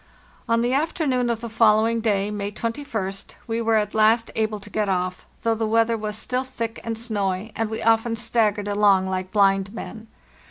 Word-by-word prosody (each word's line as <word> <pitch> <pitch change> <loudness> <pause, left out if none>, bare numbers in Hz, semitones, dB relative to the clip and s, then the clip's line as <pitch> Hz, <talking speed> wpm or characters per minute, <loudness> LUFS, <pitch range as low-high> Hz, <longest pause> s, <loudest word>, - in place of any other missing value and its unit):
On 230 0 +3
the 240 +2 +1
afternoon 275 -4 0
of 230 -1 -1
the 235 - -4
following 225 0 +3
day 205 -2 +1
(May 205 -1 -3
a2tst) 220 -4 -4
we 230 -1 -2
were 225 0 +2
at 210 -1 +1
last 220 +1 +3
able 215 -1 -1
to 210 - -10
get 210 -2 0
off, 185 -1 -2 0.2
though 230 - +2
the 225 0 -1
weather 230 +1 +3
was 210 -1 -4
still 250 +3 -2
thick 230 -3 -5
and 225 -1 -3
snowy, 205 -3 -2
and 225 -1 -1
we 220 - -4
often 225 +1 +3
staggered 220 -3 0
along 205 -2 +3
like 185 0 -3
blind 195 0 +2
men. 225 0 -8
220 Hz, 190 wpm, -23 LUFS, 205-230 Hz, 0.2 s, On